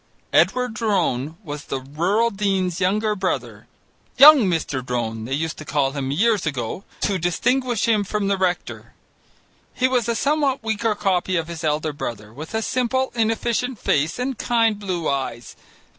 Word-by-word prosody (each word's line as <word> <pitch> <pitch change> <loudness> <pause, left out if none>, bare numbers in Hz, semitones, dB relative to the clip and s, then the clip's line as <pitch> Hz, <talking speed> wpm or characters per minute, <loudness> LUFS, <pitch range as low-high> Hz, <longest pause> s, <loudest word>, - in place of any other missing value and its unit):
Edward 250 -2 +3
Drone 170 - -1
was 150 -4 -7
the 135 - -3
Rural 175 - 0
Dean's 190 -3 -1
younger 210 +3 +1
brother, 190 -2 -3 0.5
young 300 +1 +10
Mr. 150 -6 -2
Drone, 115 -3 -3
they 130 - -4
used 160 +2 -3
to - - -7
call 140 -2 0
him, 135 -2 -3
years 200 +5 +2
ago, 135 - -3 0.2
to 195 -2 0
distinguish 240 +8 0
him 215 -3 +3
from 205 0 -2
the 200 - +2
rector. 185 -2 -3 0.8
He 255 - +2
was 245 -3 0
a 235 - +1
somewhat 280 -1 +1
weaker 220 0 0
copy 190 -2 0
of 165 -2 -1
his 170 -1 -7
elder 155 0 0
brother, 110 -6 -6
with 155 - -8
a 220 - 0
simple, 255 +2 0
inefficient 235 +2 0
face 155 -2 0
and 250 -1 -3
kind 230 -3 +2
blue 185 -5 -3
eyes. 130 -4 -3
190 Hz, 160 wpm, -22 LUFS, 150-230 Hz, 0.8 s, young